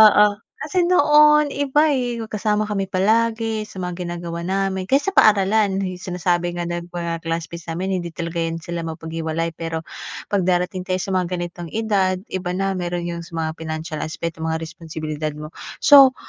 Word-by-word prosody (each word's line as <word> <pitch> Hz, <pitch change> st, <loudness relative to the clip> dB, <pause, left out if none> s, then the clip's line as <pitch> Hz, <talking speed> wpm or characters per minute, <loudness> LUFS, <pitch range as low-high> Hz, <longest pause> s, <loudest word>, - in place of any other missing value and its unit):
Oo 210 Hz, -1 st, +7 dB, 0.2 s
kasi 345 Hz, +3 st, +1 dB
noon 300 Hz, -4 st, +6 dB
iba 285 Hz, +2 st, +2 dB
eh, 245 Hz, -4 st, -1 dB
magkasama 215 Hz, -1 st, 0 dB
kami 195 Hz, -2 st, 0 dB
palagi 220 Hz, +3 st, +1 dB
sa 190 Hz, -3 st, -8 dB
mga 180 Hz, 0 st, -4 dB
ginagawa 170 Hz, 0 st, -5 dB
namin 190 Hz, 0 st, -1 dB
kahit 275 Hz, +7 st, +3 dB
sa 390 Hz, -, 0 dB
paaralan, 205 Hz, -, +4 dB, 0.2 s
sinasabi 175 Hz, -1 st, -1 dB
nga 175 Hz, -, -2 dB
ng 175 Hz, 0 st, -3 dB
mga 170 Hz, -1 st, -3 dB
classmates 165 Hz, 0 st, -4 dB
namin 185 Hz, +3 st, -1 dB
hindi 170 Hz, -2 st, -6 dB
talaga 170 Hz, 0 st, -4 dB
yan 165 Hz, 0 st, -2 dB
sila 170 Hz, -1 st, -4 dB
mapaghiwalay. 160 Hz, 0 st, -3 dB
Pero 165 Hz, -1 st, -3 dB, 0.5 s
'pag 195 Hz, -3 st, +1 dB
darating 180 Hz, +1 st, 0 dB
tayo 185 Hz, 0 st, 0 dB
sa 195 Hz, -, -4 dB
mga 185 Hz, -1 st, +1 dB
ganitong 175 Hz, -1 st, -5 dB
edad, 205 Hz, -4 st, +2 dB, 0.2 s
iba 180 Hz, -1 st, -2 dB
na. 195 Hz, 0 st, -1 dB
Meron 175 Hz, 0 st, -2 dB
yung 170 Hz, -1 st, -6 dB
sa 170 Hz, -, -13 dB
mga 160 Hz, -, -1 dB
pinansiyal 155 Hz, 0 st, -4 dB
aspeto, 165 Hz, +1 st, -5 dB
mga 160 Hz, 0 st, -2 dB
responsibilidad 155 Hz, -2 st, -5 dB
mo. 150 Hz, +1 st, -8 dB, 0.3 s
So 275 Hz, -3 st, +9 dB
180 Hz, 170 wpm, -22 LUFS, 165-210 Hz, 0.5 s, So